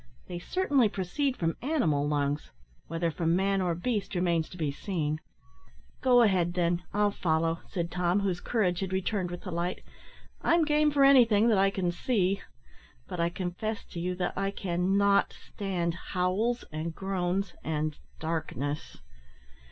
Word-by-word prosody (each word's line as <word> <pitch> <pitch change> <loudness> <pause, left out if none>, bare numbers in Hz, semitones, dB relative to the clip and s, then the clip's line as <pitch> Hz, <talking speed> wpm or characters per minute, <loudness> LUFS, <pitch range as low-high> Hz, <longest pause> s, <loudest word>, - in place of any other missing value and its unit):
They 175 - -5
certainly 280 - +2
proceed 250 - -1
from 165 -1 -1
animal 225 - +1
lungs, 145 0 -1 0.4
whether 165 +1 -1
from 165 +1 +1
man 195 +1 +2
or 175 -2 0
beast 205 +2 -2
remains 170 -3 +1
to 180 - -11
be 155 -4 -1
seen." 155 -1 -2 0.8
"Go 245 -2 +6
ahead, 180 -5 +2
then, 175 -1 +1
I'll 205 0 +2
follow," 165 -2 0
said 170 -2 -3
Tom, 180 +2 +1
whose 185 -3 -1
courage 185 -7 +1
had 190 -1 -3
returned 190 -1 -1
with 175 0 -6
the 185 - -6
light, 175 +2 -2 0.6
"I'm 335 -1 +3
game 300 0 +3
for 285 -1 +3
anything 235 -5 +6
that 210 -4 +4
I 195 0 +5
can 190 -3 -1
see; 195 0 0 0.7
but 180 - -6
I 170 0 +2
confess 185 +5 -4
to 170 - -5
you 180 +1 -2
that 180 -1 -2
I 195 0 0
can 185 0 0
not 200 0 +3
stand 180 -4 -3
howls, 185 +7 -1
and 160 +1 -4
groans 190 0 -1
and 155 -1 -1 0.2
darkness." 155 -3 -3
180 Hz, 160 wpm, -29 LUFS, 170-205 Hz, 0.8 s, Go